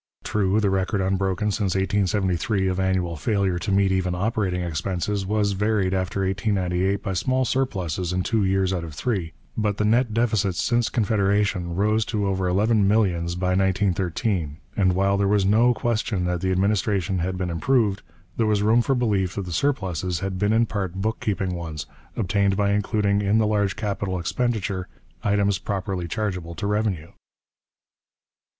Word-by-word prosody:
True, 100 0 +1
the 100 -3 +1
record, 95 +2 0
unbroken 95 +2 0
since 100 -3 -1
1873, 95 0 +1
of 95 0 -2
annual 95 -3 0
failure 95 0 0
to 100 - -3
meet 100 0 +3
even 95 -1 0
operating 95 -2 -1
expenses, 90 +4 -2
was 105 0 +1
varied 100 -1 +1
after 95 +1 -1
1898 95 -1 0
by 95 - -2
small 130 +8 +1
surpluses 95 - -1
in 90 0 0
two 110 0 +1
years 95 0 +1
out 90 -2 -2
of 80 -3 -8
three, 95 -6 -2 0.2
but 105 -2 0
the 105 - +1
net 115 +2 +3
deficits 105 -5 +1
since 120 -1 +1
Confederation 100 -5 +1
rose 105 +3 +2
to 105 -3 -1
over 95 -1 0
eleven 105 +3 +2
millions 90 -5 +1
by 90 +1 -1
1913; 95 -3 0 0.2
and 95 -3 +3
while 100 +2 +2
there 100 0 +2
was 100 -1 +2
no 115 +5 +4
question 110 -6 -1
that 90 -1 -1
the 95 0 0
administration 95 -1 +1
had 90 +2 -2
been 90 -1 -2
improved, 105 +2 +1 0.4
there 115 - +2
was 105 -1 +2
room 110 +3 +4
for 135 +3 +1
belief 100 -7 0
that 100 - -3
the 90 - -6
surpluses 95 - -1
had 95 -1 -3
been 105 +1 +2
in 115 +1 +4
part 95 -5 -3
book 110 +4 -2
keeping 95 -3 -1
ones, 80 -3 -5 0.3
obtained 100 -2 +1
by 100 -1 +2
including 100 0 +1
in 100 +2 +2
the 110 - +3
large 105 -2 +1
capital 100 -3 -2
expenditure 100 -1 -1 0.4
items 100 -1 +2
properly 95 -3 -3
chargeable 90 -4 -3
to - - -4
revenue. 105 -6 -1
100 Hz, 170 wpm, -24 LUFS, 90-105 Hz, 0.4 s, no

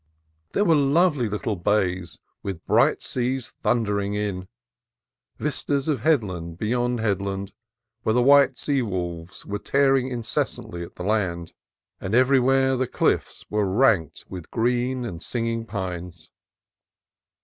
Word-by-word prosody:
There 205 - +2
were 165 - +5
lovely 145 -3 +3
little 105 +1 -2
bays 90 -2 0 0.2
with 95 -4 -6
bright - - +3
seas 125 0 -1
thun 120 -1 +2
dering 100 -1 -1
in; 100 -3 -3 0.9
vistas 140 0 -1
of 150 -5 +1
headland 95 - 0
beyond 120 +3 0
headland 100 -2 -2 0.5
where 110 - +1
the 125 - +4
white 140 -1 +6
sea 140 -2 +1
wolves 90 -5 -5
were 105 +1 -4
tearing 135 -2 +2
incessantly 115 -7 -3
at 85 - -8
the - - -6
land; 90 -5 -1 0.5
and 95 +4 -2
everywhere 130 +1 +4
the 130 0 0
cliffs - - 0
were 105 -1 +1
ranked 100 - +2
with 90 -4 -8
green 125 +2 0
and 85 -7 -6
singing 115 -1 -2
pines. 90 -5 -6
110 Hz, 130 wpm, -24 LUFS, 95-130 Hz, 0.9 s, white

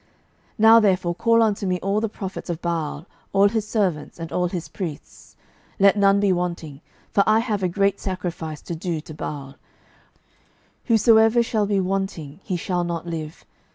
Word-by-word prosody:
12:010:019 - - -37 0.5
Now 225 +1 +7
therefore 185 -5 +1
call 230 +5 +3
unto 205 -2 0
me 180 -1 0
all 200 +2 0
the 225 - -1
prophets 195 -2 -7
of 170 -2 -3
Baal, 165 -3 -3 0.3
all 200 +1 +5
his 215 -1 -2
servants, 185 -9 -1
and 165 0 -6
all 180 0 0
his 175 -1 -5
priests; 165 -7 -8 0.4
let 200 +1 +6
none 200 -1 +4
be 200 -2 +3
wanting: 170 -5 -4 0.3
for 200 - +3
I 215 - +5
have 220 -3 -1
a 185 - +1
great 200 +2 +1
sacrifice 175 -5 -5
to - - -5
do 165 0 -3
to 155 +1 -10
Baal; 140 -2 -7 1.3
whosoever 225 0 +5
shall 215 -3 0
be 200 -1 +1
wanting, 185 -5 -3
he 190 - -3
shall 175 0 -1
not 170 -1 -4
live. 160 -1 -6
185 Hz, 175 wpm, -23 LUFS, 170-205 Hz, 1.3 s, Now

